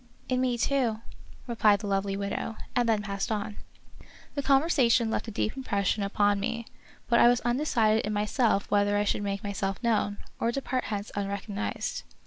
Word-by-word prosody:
" - - -30
In 255 0 +1
me, 250 -2 +1
too," 235 -2 +1 0.5
replied 215 -4 +3
the - - -5
lovely 195 0 0
widow, 200 +2 -3 0.2
and 240 -1 +2
then 215 -2 +2
passed 200 +1 -3
on. 210 -1 -3 0.8
The 285 - -2
conversation 270 -5 +3
left - - -2
a - - -3
deep 215 +2 -2
impression 205 -5 0
upon 205 0 +2
me, 230 +3 -3 0.4
but 235 - +4
I - - +7
was 245 0 +4
undecided 240 -4 +2
in 210 - -2
myself 210 0 +1
whether 205 0 +3
I 205 - +2
should 205 - 0
make 200 -1 -3
myself 195 -1 -2
known, 210 -3 +1 0.2
or 230 - +1
depart 255 0 -2
hence 205 0 -4
unrecognized. 200 +1 -3
215 Hz, 175 wpm, -28 LUFS, 200-240 Hz, 0.8 s, I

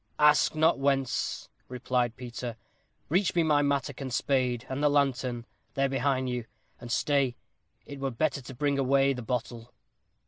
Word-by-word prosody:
"Ask 150 +1 +4
not 160 -1 +3
whence," 135 -2 0 0.2
replied 125 -1 -1
Peter. 120 -1 -6 0.5
"Reach 185 +5 +1
me 170 - +4
my 150 -2 +3
mattock, 140 -1 -1
and 130 -1 -4
spade, 125 -1 0
and 130 +2 -3
the 150 - +4
lantern; 130 -4 0 0.3
they 135 - +1
are 135 - +2
behind 135 -1 0
you. 125 -2 -3 0.3
And 120 -1 -8
stay, 140 -3 +1 0.5
it 140 -1 -9
were 135 0 -1
better 140 +3 -1
to 130 +1 -10
bring 140 +1 0
away 135 +1 +3
the 125 - -6
bottle." 120 0 -4
135 Hz, 165 wpm, -28 LUFS, 125-140 Hz, 0.5 s, Ask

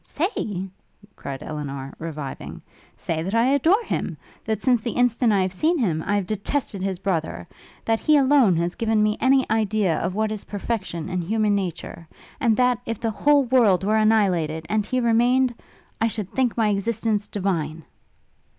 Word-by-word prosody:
'Say?' 220 - -3 0.5
cried 135 -1 -7
Elinor, 140 -3 -6
reviving, 150 -4 -6 0.4
'say 160 -1 -3
that 190 +6 -3
I 240 +4 +3
adore 335 - +3
him! - - -3 0.3
That 220 -2 -1
since 245 0 +2
the 235 0 -3
instant 245 -1 +2
I 195 -2 +3
have 185 0 -3
seen 320 - +1
him, 175 - 0
I 205 - +1
have 200 -2 0
detested 215 +1 -2
his 190 -1 -2
brother; 175 -3 -3 0.4
that 225 0 +1
he 305 -1 +4
alone 265 -8 +4
has 170 +1 -1
given 220 0 +1
me 210 0 +2
any 265 0 +4
idea 215 -5 +1
of 185 - -2
what 215 0 0
is 215 -2 -5
perfection 195 -5 -4
in 180 -1 -2
human 210 +3 +1
nature! 175 -3 -4 0.3
And 225 -3 +2
that, 250 -2 +3
if 230 -2 -3
the 230 -2 -1
whole 285 +5 +3
world 230 -8 +3
were 215 +2 +2
annihilated, 185 -8 +2
and 215 0 +1
he 255 - 0
remained... 245 +2 +3 0.5
I 225 - +4
should 210 -4 -5
think 255 -3 0
my 220 -2 +2
existence 210 +1 -1
divine!' 165 -6 -2
215 Hz, 175 wpm, -23 LUFS, 185-235 Hz, 0.5 s, he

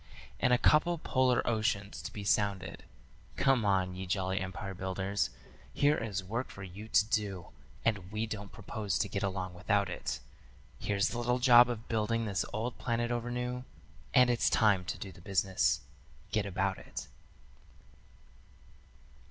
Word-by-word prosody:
And 125 - +3
a 125 - +6
couple 155 +6 +4
polar 130 -4 +2
oceans 105 -3 0
to - - -6
be 105 - -6
sounded. 100 -2 0 0.5
Come 135 -4 +3
on, 95 -3 +2
ye 95 +1 -6
jolly 95 0 0
empire 95 +1 -5
builders, 95 +2 -1 0.5
here 145 +1 +4
is 100 -7 -3
work 115 +7 -3
for 100 - -9
you 95 +4 -9
to 105 - +4
do, 100 -5 -2 0.4
And 100 -5 0
we 110 +1 -1
don't 105 -2 -6
propose 105 -3 -3
to 100 - 0
get 100 +1 -3
along 95 -2 -2
without 100 +3 +1
it. - - -3 0.6
Here's 100 -1 +1
the 120 - -3
little 125 +1 +1
job 125 -1 +7
of 115 -2 -4
building 115 +1 0
this 100 -3 0
old 115 +3 -3
planet 120 0 -1
over 120 0 -2
new, 125 +1 -3 0.5
And 125 -1 +6
it's 120 - +2
time 105 -5 +3
to - - -3
do 95 - -7
the 90 - -15
business. 95 -6 +1 0.5
Get 105 -2 0
about 95 0 -1
it. - - -7
105 Hz, 160 wpm, -32 LUFS, 95-120 Hz, 0.6 s, job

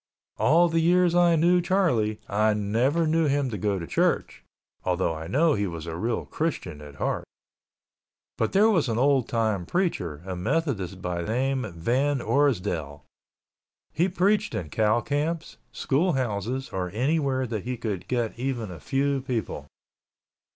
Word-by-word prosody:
All 170 +5 +5
the 165 0 +1
years 175 +1 +3
I 175 -1 +5
knew 175 +3 +4
Charlie, 165 - +1
I 105 +1 +2
never 120 +11 +1
knew 160 0 +2
him 140 -2 0
to 105 - -3
go 100 +1 0
to 85 - -5
church - - 0 0.4
(although 90 -2 0
I 80 0 -6
know 155 - +3
he 100 -1 0
was 85 -2 -6
a 80 -1 -5
real 115 +6 -2
Christian 95 - -3
at 75 -1 -11
heart) - - -2 1.1
but 110 - -1
there 205 +3 +5
was 165 - +2
an 115 - -1
old 135 -1 +2
time 110 -5 0
preacher, 90 - -1
a 95 -1 -4
Methodist 100 - -2
by 90 -1 -2
name 125 +4 -1
Van 135 - +1
Orsdell. 90 - 0 0.9
He 175 +4 +2
preached 200 +4 +1
in 80 - -4
cow 110 +1 +2
camps, 155 +6 -2
school 160 +6 +1
houses 125 +1 -2
or 90 -1 -3
anywhere 135 0 +1
that 110 -4 -4
he 125 0 -3
could 105 -6 -4
get 120 -2 -2
even 120 -6 -3
a 85 - -9
few 140 - 0
people. 115 - -4
125 Hz, 160 wpm, -26 LUFS, 100-155 Hz, 1.1 s, All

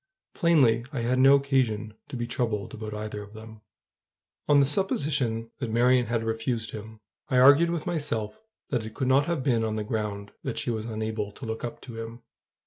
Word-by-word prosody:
Plainly, 135 - +3
I 135 -6 -3
had 125 +2 +1
no 135 +2 +7
occasion 130 -6 0
to 145 - -7
be 120 -1 -2
troubled 115 -4 -2
about 110 -1 -6
either 105 0 -5
of 105 +1 -12
them. 110 0 -11 0.9
On 145 -1 +6
the 140 - +5
supposition 135 - 0
that 125 -4 -3
Marion 125 +2 +3
had 115 -1 -1
refused 115 +1 -2
him, 110 0 -9 0.3
I 130 - +2
argued 140 +6 +7
with 170 -2 -2
myself 145 - -2 0.3
that 125 -5 0
it 110 0 -9
could 130 - -1
not 135 +2 +4
have 170 -6 -1
been 120 -5 +2
on 110 -1 -1
the 110 - -2
ground 105 -2 -3
that 135 - -4
she 120 - -1
was 110 0 -3
unable 110 -2 -3
to 135 - -9
look 110 0 -5
up 120 - -5
to 115 -3 -9
him. 115 +1 -9
115 Hz, 200 wpm, -27 LUFS, 110-135 Hz, 0.9 s, no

